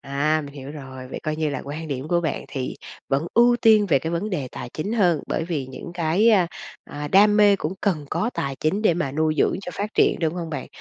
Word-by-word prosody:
À, 150 +3 0
mình 140 - -12
hiểu 135 0 -8
rồi. 130 -3 -9
Vậy - - -6
coi 155 0 -2
như 155 -1 0
là 135 - -4
quan 155 +3 -6
điểm 140 +1 -4
của 175 0 +2
bạn 160 -4 -3
thì 130 -2 -4 0.3
vẫn 140 +4 0
ưu 240 +1 +5
tiên 215 -2 +6
về 160 -7 +3
cái 160 +4 -4
vấn 200 +6 -2
đề 145 -9 -2
tài - - -6
chính 200 +8 -3
hơn 175 -9 +3
bởi - - -1
vì 155 -6 -3
những 130 +5 -9
cái, 175 +6 +2
a, 190 -6 +4 0.4
à, 145 0 -6
đam 205 +5 +5
mê 205 -1 +6
cũng 160 -2 -3
cần 165 -8 0
có 235 - 0
tài 135 -1 -3
chính 195 +8 0
để 180 - +4
mà 155 -6 -2
nuôi 155 +1 +1
dưỡng - - +3
cho 180 - -6
phát 205 +4 -3
triển, - - +3
đúng 160 0 0
hông 170 -2 -5
bạn? 145 -4 -4
160 Hz, 255 wpm, -23 LUFS, 140-195 Hz, 0.4 s, tiên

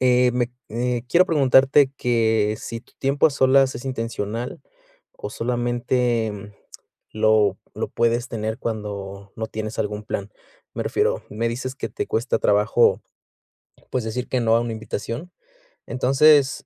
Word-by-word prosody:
eh, 125 -1 +4
me 125 0 -1 0.2
eh, 120 +1 -1
quiero 175 +5 +5
preguntarte 135 -2 +4
que 110 -3 +1
si 115 -1 -6
tu - - -27
tiempo 140 +3 +3
a 155 - +1
solas 135 -1 +3
es 120 +2 -7
intencional, 115 -2 -4 0.5
o - - -7
solamente, 120 -1 0
mm, 105 0 -9 0.6
lo 110 -2 +3 0.2
lo - - -3
puedes 120 +1 0
tener 110 0 -3
cuando 100 -3 -5
no 110 0 -3
tienes 110 0 -5
algún 105 0 -3
plan. 100 -1 -4 0.4
Me - - -2
refiero, - - 0
me 115 +2 -1
dices 130 +3 -4
que - - -5
te - - -4
cuesta 115 +4 0
trabajo 105 +3 +3 0.9
pues 125 -3 -1
decir 115 +3 -4
que 130 - 0
no 115 -1 +3
a - - +2
una 120 0 -3
invitación. 115 - -5 0.6
Entonces, 135 +3 +4
120 Hz, 150 wpm, -23 LUFS, 110-130 Hz, 0.9 s, quiero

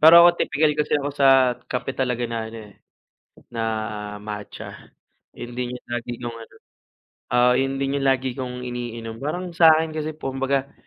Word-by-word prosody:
Pero 165 +2 +10
ako 175 0 +6
tipikal 150 +1 +2
kasi 150 0 -1
ako 140 - -2
sa 135 -3 +5
kape 130 +1 -3
talaga 125 -2 0
na 115 -1 -3
ano, - - -8
eh, - - -17 0.8
na 115 -1 -2 0.6
matcha, 105 0 -8 0.4
yun 120 0 -8
din 125 0 -3
yung - - -47
lagi 120 0 -3
kong 120 -1 -5
ano, - - -18 0.8
oo, 125 0 +5
yun 135 0 0
din 135 0 0
yung 135 - 0
lagi 130 0 +2
kong 125 -1 -4
iniinom, 115 -2 -5
parang 175 +5 -3
sa'kin 160 -1 +5
kasi 155 0 -3
kumbaga 135 -1 -1
130 Hz, 165 wpm, -23 LUFS, 120-150 Hz, 0.8 s, Pero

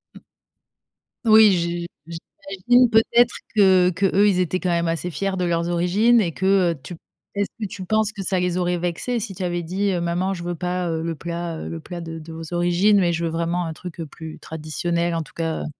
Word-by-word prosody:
Mmh. - - -13 1.0
Oui, 220 -1 +7
j 170 -1 -1 0.2
j'imagine 195 +8 +1
peut-être 235 +2 +4 0.2
que 190 -4 +5
qu'eux, 195 +2 +2
ils 190 -3 +2
étaient 185 0 0
quand 185 - -1
même 170 -1 +1
assez 165 +2 -2
fiers 195 +3 -2
de 180 - -2
leurs 170 -1 0
origines 190 +7 +3
et 175 -5 -1
que, 190 -1 +2
heu, 165 - -6
tu 175 - -8
p - - -22 0.3
est-ce 200 0 0
que 210 - -2
tu 185 0 -8
penses 215 +2 +1
que 205 -3 -6
ça 185 0 0
les 180 0 0
aurait 180 -1 0
vexés 180 +8 -2
si 205 -3 -6
tu 190 - -5
avais 175 -1 -1
dit, 190 +4 -1
heu: 180 - -1
«Maman 175 +3 -1
je 175 -2 -7
veux 175 0 -3
pas, 180 +1 -2
heu, 160 -1 -2
le 165 -1 -3
plat, 170 +1 -5
heu - - -6
le 165 - -5
plat 175 +1 -7
de 165 -1 -7
de 160 +1 -11
vos 165 +1 -8
origines 175 +4 +3
mais 175 -2 +2
je 170 +1 -2
veux - - 0
vraiment 170 +2 -1
un 165 - -4
truc, 175 +1 -10
heu, 165 - -3
plus 160 +2 -10
traditionnel 170 +2 -2
en 165 - -1
tout 160 - -12
cas, 165 -1 -2
heu»? - - -5
175 Hz, 235 wpm, -22 LUFS, 170-195 Hz, 1.0 s, Oui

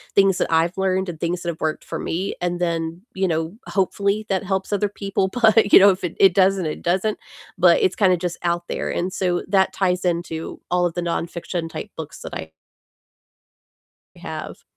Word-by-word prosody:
things 195 -2 +5
that - - 0
I've 165 +2 +2
learned 190 -1 0
and 160 - -7
things 175 +1 -2
that 170 - -2
have 160 - -6
worked 155 -1 -1
for - - -5
me, 185 +4 -2
and 175 0 -1
then, 165 0 -2
you 190 0 +1
know, 165 +3 -2
hopefully 200 +2 0
that 195 0 0
helps 190 +1 -2
other 205 0 +1
people, 195 -1 -1
but 220 -2 +4
you - - +12
know, 200 +1 +8
if 185 0 -5
it 175 - -3
it 190 -3 +6
doesn't, 190 -2 +3
it 155 - -4
doesn't, 190 +5 0 0.4
but - - +5
it's 390 - +2
kinda 185 -3 +3
just 175 0 -3
out 170 0 0
there, - - -3
and 185 +2 -2
so 180 -2 0
that 190 -1 +3
ties 180 -1 0
into 170 -2 -2
all 180 0 +3
of 165 - -8
the 175 - -1
nonfiction-type 170 +2 -4
books 160 -2 -7
that - - -8
I 80 - -6 1.7
have. - - -7
180 Hz, 195 wpm, -22 LUFS, 170-195 Hz, 1.7 s, you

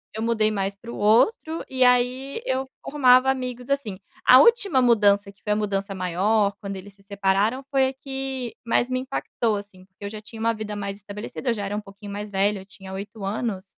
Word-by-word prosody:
eu 220 - -3
mudei 220 -2 +2
mais 195 -1 -1
para 235 +4 -10
o - - -7
outro, 315 - +2
e 260 -1 +2
aí, 250 - +2
eu 265 - -1
formava 255 -2 +4
amigos 250 -1 -3
assim. 255 -9 -1 0.3
A 255 - +9
última 410 - +5
mudança, 205 -4 +4
que 200 - -32
foi 210 - -2
a - - 0
mudança 200 -1 -2
maior, 200 +3 +1
quando 200 -2 -5
eles 195 +1 -11
se 195 - -23
separaram 200 +5 0
foi 270 -2 +3
a - - -7
que 265 -2 -5
mais 240 +1 +2
me 255 0 0
impactou, 240 -4 -2
assim, 195 -2 -11
porque 190 +1 -12
eu - - -3
já 215 0 -8
tinha 220 +1 -10
uma 230 +1 +1
vida 215 -1 -5
mais 200 -1 -4
estabelecida, 210 +5 -6
eu - - +3
já 205 -2 -4
era 205 - -3
um 210 - -2
pouquinho 200 0 -11
mais 205 0 -6
velha, 200 +1 +1
eu - - -14
tinha 190 -1 -11
8 200 +2 -7
anos 200 -1 -2
215 Hz, 220 wpm, -24 LUFS, 200-255 Hz, 0.3 s, A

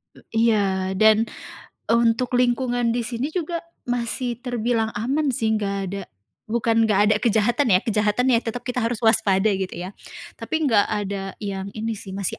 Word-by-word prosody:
E - - -16 0.3
iya, 190 -3 +1
dan 220 +2 +4 0.6
untuk 235 +1 +2
lingkungan 245 -1 +1
di 240 - 0
sini 235 +3 -3
juga 340 -1 -2 0.3
masih 245 0 -2
terbilang 235 -3 -1
aman 270 +6 0
sih 220 -1 0
nggak 200 -2 -2
ada 195 0 -4 0.4
bukan 230 0 +2
nggak 205 -2 +2
ada - - +5
kejahatan 230 +2 +2
ya, 185 - +5
kejahatan 215 +1 +1
ya 230 - +5
tetap 235 +1 -5
kita 250 0 -4
harus 230 0 -1
waspada, 215 -2 +3
gitu 190 -1 -3
ya. 180 +2 -6 0.5
Tapi - - -5
enggak 225 -8 +4
ada 200 -2 -3
yang 195 -1 -4
ini 225 +1 -3
sih, 190 - -9
masih 195 -2 -3
225 Hz, 165 wpm, -23 LUFS, 205-245 Hz, 0.6 s, ada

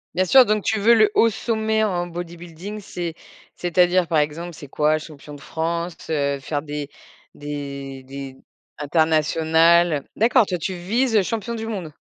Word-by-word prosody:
Bien 185 - +3
sûr, 255 +7 +7
donc 215 -1 0
tu 220 - 0
veux 225 +4 +5
le 215 -2 +4
haut 230 - +4
sommet 220 0 -1
en 175 -4 -1
bodybuilding, 175 +3 -8
c'est 175 -4 -5 0.4
c'est-à-dire, 180 0 +2
par 160 -2 +2
exemple, 165 +4 -2
c'est 145 -4 -11
quoi? 155 +1 +2
Champion 150 -1 -11
de 145 - -11
France, 170 +1 -4
heu, 140 -2 0
faire 145 +1 -3
des 145 -1 -6 0.4
des 140 -2 -6
des 135 0 -8 0.4
internationales, 160 +2 +3
heu? - - -36
D'accord, 235 +2 +4
toi, 185 -2 -2
tu 180 +3 -3
vises, 220 +7 0
heu, - - +5
champion 225 +3 -3
du 225 -1 -5
monde? 185 -8 -5
170 Hz, 170 wpm, -22 LUFS, 150-205 Hz, 0.4 s, sûr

